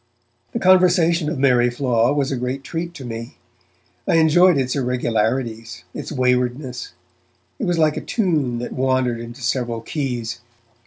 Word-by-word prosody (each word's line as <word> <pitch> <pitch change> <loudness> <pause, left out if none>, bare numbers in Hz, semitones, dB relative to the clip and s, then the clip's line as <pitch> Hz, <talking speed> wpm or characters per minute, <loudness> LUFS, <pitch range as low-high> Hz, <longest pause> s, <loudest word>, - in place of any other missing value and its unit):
The - - -1
conversation 180 -4 +4
of 155 - -3
Mary 125 -3 +3
Flaw 120 -1 +1
was 145 -1 0
a - - 0
great 125 +2 -3
treat 170 +4 -5
to 135 - -8
me. 115 0 -7 0.7
I - - +3
enjoyed 165 +2 +5
its 130 0 0
irregularities, 120 -2 -1
its - - -6
waywardness; 125 - -1 0.7
it - - -1
was 175 -1 0
like 155 -2 +2
a - - -2
tune 155 - 0
that 120 - -5
wandered 130 -2 0
into 120 +3 -9
several 120 -2 -1
keys. 120 -5 -3
130 Hz, 150 wpm, -21 LUFS, 120-155 Hz, 0.7 s, enjoyed